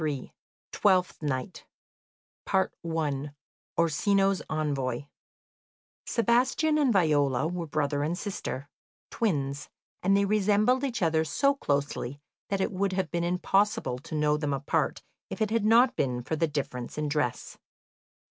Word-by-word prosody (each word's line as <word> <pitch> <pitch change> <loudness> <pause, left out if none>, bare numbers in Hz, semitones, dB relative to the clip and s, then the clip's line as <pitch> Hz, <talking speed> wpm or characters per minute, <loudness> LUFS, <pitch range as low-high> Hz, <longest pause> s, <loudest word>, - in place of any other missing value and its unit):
] - - -76
Twelfth 185 -4 +2
Night 130 -4 -3 2.1
Orsino's 195 +4 +2
Envoy 140 -5 -1 1.0
Sebastian 255 +7 +2
and 280 -4 +3
Viola 150 - +2
were 175 -1 -4
brother 145 -1 0
and 160 +4 -1
sister, 185 -9 -5 0.4
twins, 145 -10 -1 0.3
and 195 +2 +3
they 200 - +3
resembled 215 +5 +2
each 240 -8 -1
other 160 -1 +2
so 275 - +2
closely 140 - -2 0.3
that 195 - 0
it - - 0
would 195 0 -1
have 190 0 -1
been 170 0 -1
impossible 180 - +1
to 155 - -7
know 150 0 +2
them 150 -2 -1
apart 140 +1 -1 0.3
if - - -6
it 215 -1 0
had 225 -2 +1
not 235 +4 +5
been 125 -2 -1
for 160 - -2
the 165 +1 +1
difference 135 -5 -4
in 150 0 -1
dress. 145 -5 -2
165 Hz, 130 wpm, -28 LUFS, 145-205 Hz, 2.1 s, not